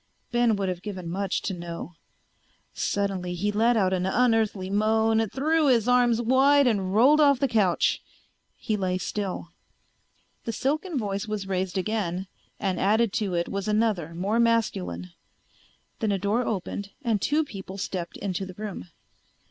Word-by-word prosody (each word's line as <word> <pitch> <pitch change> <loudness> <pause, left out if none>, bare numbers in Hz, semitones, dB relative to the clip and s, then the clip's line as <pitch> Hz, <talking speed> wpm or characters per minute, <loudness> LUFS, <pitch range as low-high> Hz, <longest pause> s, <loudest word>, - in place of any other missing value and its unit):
Ben 240 -2 +3
would 200 -1 -2
have 180 -1 -3
given 185 -4 -6
much 190 +2 -2
to 195 - -2
know. 170 0 -7 0.8
Suddenly 190 -3 -2
he 205 +4 0
let 230 +3 +3
out 190 -3 +2
an 185 0 0
unearthly 220 -3 +2
moan, 220 +2 +2
threw 310 +5 +1
his 240 -4 +3
arms 245 -2 +4
wide 270 +4 +4
and 200 -6 +1
rolled 280 +7 +6
off 280 -2 +5
the 275 - +2
couch. 210 -7 +2 0.6
He 220 - -2
lay 185 -2 -1
still. 190 -2 -4 1.0
The 230 - -2
silken 305 - -1
voice 200 -3 -2
was 210 -2 -3
raised 190 0 -2
again 190 -2 -1 0.3
and 190 -3 -1
added 215 +2 +2
to 205 -6 -1
it 170 0 0
was 200 +1 -4
another, 210 -7 0
more 200 +6 0
masculine. 90 - 0 0.9
Then 220 -2 0
a 200 - +1
door 205 +6 0
opened 200 0 -3
and 225 -5 0
two 305 +2 +2
people 195 -5 -8
stepped 185 -3 -4
into 195 -1 -3
the 185 -1 -8
room. 205 - -6
205 Hz, 155 wpm, -26 LUFS, 185-230 Hz, 1.0 s, rolled